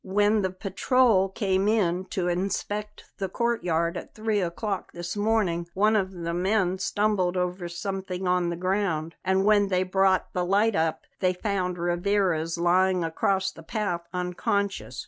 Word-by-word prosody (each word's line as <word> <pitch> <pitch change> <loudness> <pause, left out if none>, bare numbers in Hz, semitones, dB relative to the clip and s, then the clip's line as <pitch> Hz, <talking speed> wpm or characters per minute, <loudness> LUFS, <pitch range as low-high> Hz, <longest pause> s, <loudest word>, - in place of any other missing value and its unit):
When 205 +2 +2
the 190 - 0
patrol 195 +2 +2
came 195 -1 0
in 190 -4 +1
to 185 -2 -2
inspect 200 +3 -2 0.2
the 195 -1 -2
courtyard 180 -8 0
at - - -9
three 215 -2 0
o'clock 195 +2 -3
this 175 +2 -5
morning 205 -5 +1
one 210 +3 +3
of 190 -3 +1
the 170 -2 -4
men 185 +1 +1
stumbled 195 -3 +1
over 180 0 -2
something 190 +1 -4
on 180 -1 +2
the 170 - -2
ground; 180 -3 -1
and 190 +1 +2
when 205 -1 +4
they 185 -1 +1
brought 190 0 +1
the 180 - 0
light 205 +5 +2
up 160 0 0 0.2
they 185 -1 +2
found 180 -2 -2
Rivarez 175 -1 0
lying 180 +1 +3
across 190 +4 0
the 165 - -13
path 175 0 -2
unconscious. 180 -3 -2
190 Hz, 155 wpm, -26 LUFS, 175-205 Hz, 0.2 s, when